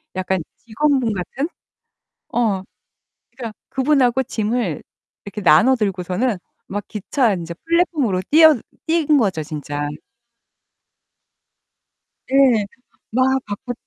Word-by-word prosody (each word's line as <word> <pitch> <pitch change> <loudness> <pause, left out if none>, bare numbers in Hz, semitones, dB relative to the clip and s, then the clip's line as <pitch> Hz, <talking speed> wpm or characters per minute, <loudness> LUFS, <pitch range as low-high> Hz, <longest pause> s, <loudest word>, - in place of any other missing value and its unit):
약간 185 0 -1 0.2
직원분 250 0 0
같은? 225 - -3 0.9
어. 220 -5 +1 0.7
그러니까 235 -3 -7 0.2
그분하고 265 -2 +2
짐을 220 -7 -2 0.4
이렇게 205 +1 -6
나눠 190 +9 +6
들고서는 195 +1 -1 0.3
막 205 +1 -4
기차 220 +2 0
인제 170 -2 -5
플랫폼으로 315 - +1
뛰어 315 0 +7 0.3
뛴 330 -1 +2
거죠, 195 -9 +1
진짜. 145 -1 -4 2.4
네. 260 -6 +4 0.5
막 260 +3 +2
갖고 205 +4 -5
230 Hz, 210 characters per minute, -20 LUFS, 190-265 Hz, 2.4 s, 뛰어